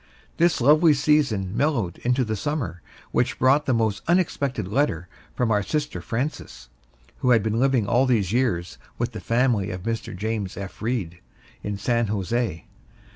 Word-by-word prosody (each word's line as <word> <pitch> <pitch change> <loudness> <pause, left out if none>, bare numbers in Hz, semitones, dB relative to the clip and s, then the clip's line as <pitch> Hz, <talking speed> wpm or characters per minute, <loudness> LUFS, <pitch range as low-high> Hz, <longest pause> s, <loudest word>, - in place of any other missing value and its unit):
This 170 0 +3
lovely 150 +4 +5
season 135 -10 +1
mellowed 120 - 0
into 125 +2 +1
the 110 0 -2
Summer 105 - -3 0.3
which - - 0
brought 135 +3 +3
a - - +4
most 110 -3 0
unexpected 140 - 0
letter 100 - 0 0.3
from 120 -2 0
our 105 -1 +3
sister 150 - -3
Frances, 115 - -4 0.5
who 125 - +1
had 115 -4 +5
been 110 +1 0
living 130 -4 +2
all 125 +6 +3
these 110 -6 +1
years 115 -9 0 0.2
with - - -2
the - - -7
family 115 -4 +1
of 90 0 -6
Mr. 115 -3 -3
James 105 -2 -3
F. 100 -1 -8
Reed, 105 -7 -2 0.4
in 105 -1 -4
San 115 +2 0
Jose. 105 -2 -2
115 Hz, 160 wpm, -24 LUFS, 100-135 Hz, 0.5 s, lovely